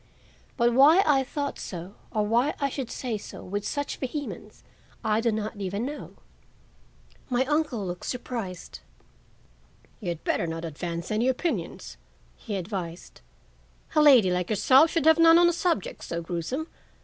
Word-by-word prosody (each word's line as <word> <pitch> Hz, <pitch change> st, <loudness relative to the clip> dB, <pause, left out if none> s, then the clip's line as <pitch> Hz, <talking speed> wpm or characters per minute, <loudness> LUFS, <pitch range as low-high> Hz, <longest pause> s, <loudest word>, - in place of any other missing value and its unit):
But 240 Hz, -1 st, +3 dB
why 300 Hz, +9 st, +7 dB
I 275 Hz, -3 st, +4 dB
thought 285 Hz, +2 st, -4 dB
so 180 Hz, +1 st, -7 dB, 0.2 s
or 215 Hz, -1 st, 0 dB
why 240 Hz, +7 st, +2 dB
I 280 Hz, -1 st, +1 dB
should 260 Hz, -3 st, -5 dB
say 235 Hz, -5 st, -3 dB
so -, -, -10 dB
with 205 Hz, +2 st, -4 dB
such 285 Hz, +4 st, -3 dB
vehemence, 285 Hz, +2 st, -6 dB, 0.4 s
I 215 Hz, +1 st, +1 dB
do 230 Hz, 0 st, +2 dB
not 215 Hz, 0 st, -3 dB
know 205 Hz, -, -9 dB
even 200 Hz, +5 st, -2 dB
now. 295 Hz, +2 st, -7 dB, 1.2 s
My 250 Hz, +1 st, +1 dB
uncle 290 Hz, -7 st, 0 dB
looked 180 Hz, -1 st, -5 dB
surprised. 230 Hz, -8 st, -5 dB, 1.2 s
"You 200 Hz, -, -7 dB
had 170 Hz, -2 st, -5 dB
better 170 Hz, -, 0 dB
not 165 Hz, +1 st, -4 dB
advance 170 Hz, +3 st, -5 dB
any 220 Hz, +4 st, +1 dB
opinions," 260 Hz, +6 st, -2 dB, 0.4 s
he 210 Hz, -, -6 dB
advised. 180 Hz, -3 st, -6 dB, 0.7 s
"A 305 Hz, -, +6 dB
lady 255 Hz, -11 st, +7 dB
like 180 Hz, -1 st, -1 dB
yourself 260 Hz, +8 st, +5 dB
should 325 Hz, -3 st, 0 dB
have 320 Hz, +1 st, +6 dB
none 330 Hz, 0 st, +8 dB
on 345 Hz, 0 st, +6 dB
a 345 Hz, -, +2 dB
subject 335 Hz, -, -1 dB
so 170 Hz, -, -4 dB
gruesome. 180 Hz, -, -3 dB
235 Hz, 160 wpm, -26 LUFS, 185-285 Hz, 1.2 s, none